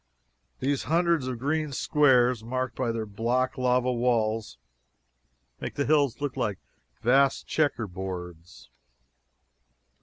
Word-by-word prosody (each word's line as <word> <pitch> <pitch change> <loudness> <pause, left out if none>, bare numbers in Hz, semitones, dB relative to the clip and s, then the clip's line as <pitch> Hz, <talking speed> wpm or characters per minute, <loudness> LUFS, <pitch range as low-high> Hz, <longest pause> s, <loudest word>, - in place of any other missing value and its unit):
These 140 +1 -1
hundreds 170 -4 +2
of 125 -2 -3
green 150 +4 -1
squares, 125 -5 +3
marked 130 0 -3
by 125 -3 -1
their 115 -1 -3
black 120 +5 -1
lava 125 0 +1
walls, 115 -2 0 1.0
make - - -6
the 140 - 0
hills 145 -5 +2
look 145 -2 -3
like 110 -7 -1 0.5
vast 135 +3 +3
checkerboards. 95 - -3
125 Hz, 110 wpm, -27 LUFS, 115-140 Hz, 1.0 s, squares